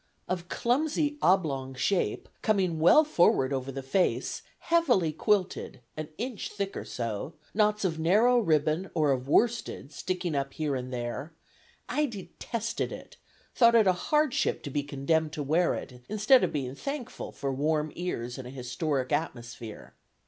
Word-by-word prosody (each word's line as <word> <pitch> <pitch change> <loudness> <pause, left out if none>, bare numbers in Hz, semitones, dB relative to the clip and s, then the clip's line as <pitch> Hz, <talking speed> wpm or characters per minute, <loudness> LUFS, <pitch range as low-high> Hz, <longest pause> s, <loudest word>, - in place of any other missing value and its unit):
Of 180 -1 -3
clumsy 295 +4 0
oblong 140 -8 +2
shape, 175 +9 0
coming 185 -6 +1
well 175 - +7
forward 170 - +3
over 135 0 -2
the 135 0 -6
face; 180 +8 0 0.2
heavily 250 - +2
quilted, 195 - 0 0.2
an 155 0 -5
inch 240 -1 -4
thick 200 -1 -3
or - - -5
so; 115 +5 -4 0.2
knots 210 0 +2
of 160 -3 -1
narrow 215 +10 +4
ribbon 160 -1 +1
or 155 -3 +3
of 130 -1 -1
worsted 225 - +1
sticking 180 0 -3
up 140 -1 -2
here 150 -3 -1
and 130 0 -4
there; 125 +6 -4 0.5
I 300 0 +1
detested 230 +1 -4
it, - - -10 0.4
thought 235 -1 +5
it 225 -2 +6
a 185 - +5
hardship 300 +9 +1
to 145 - -5
be 145 - 0
condemned 145 +3 0
to 150 - -3
wear 165 +5 +2
it, 125 -1 -8
instead 215 +5 +5
of - - +1
being 135 -4 -3
thankful 275 - -5
for 135 -1 -3
warm 150 +2 0
ears 125 -9 -4
and 125 - -7
a - - -8
historic 130 +2 -2
atmosphere. 120 -7 -4
160 Hz, 155 wpm, -28 LUFS, 135-210 Hz, 0.5 s, well